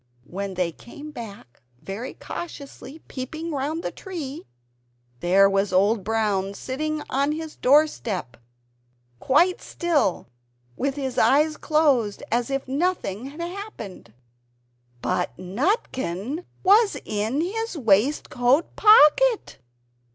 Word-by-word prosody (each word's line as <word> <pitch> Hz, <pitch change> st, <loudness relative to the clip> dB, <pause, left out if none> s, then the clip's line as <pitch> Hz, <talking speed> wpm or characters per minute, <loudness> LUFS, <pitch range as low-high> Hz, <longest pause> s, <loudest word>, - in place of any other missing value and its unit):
When 195 Hz, +4 st, -5 dB
they 180 Hz, -2 st, 0 dB
came 295 Hz, -, -11 dB
back 205 Hz, -, -10 dB, 0.2 s
very 205 Hz, -, -6 dB
cautiously, 300 Hz, -2 st, -8 dB
peeping 310 Hz, +6 st, -5 dB
round 300 Hz, +4 st, -2 dB
the -, -, -3 dB
tree 310 Hz, -, -7 dB, 0.7 s
there 190 Hz, +5 st, +5 dB
was 195 Hz, 0 st, +1 dB
Old 200 Hz, +3 st, +3 dB
Brown 200 Hz, -2 st, 0 dB
sitting 305 Hz, +6 st, -3 dB
on 280 Hz, +3 st, +1 dB
his 315 Hz, 0 st, -6 dB
door 290 Hz, +4 st, +5 dB
step, 185 Hz, -, -5 dB, 0.8 s
quite 340 Hz, -, +3 dB
still, 315 Hz, -, 0 dB, 0.5 s
with 275 Hz, +1 st, -1 dB
his 265 Hz, -3 st, -2 dB
eyes 305 Hz, +3 st, +4 dB
closed, 280 Hz, -11 st, +1 dB
as 240 Hz, +2 st, +1 dB
if 275 Hz, -1 st, -2 dB
nothing 270 Hz, -, -1 dB
had 295 Hz, +4 st, -9 dB
happened. 345 Hz, -, -7 dB, 0.9 s
BUT 120 Hz, -, -1 dB
NUTKIN 250 Hz, -, -2 dB, 0.2 s
WAS 410 Hz, +3 st, +5 dB
IN 220 Hz, +7 st, -1 dB
HIS 450 Hz, +2 st, -3 dB
WAISTCOAT 245 Hz, -, +2 dB
POCKET! 435 Hz, +4 st, +5 dB
270 Hz, 110 wpm, -24 LUFS, 205-315 Hz, 0.9 s, there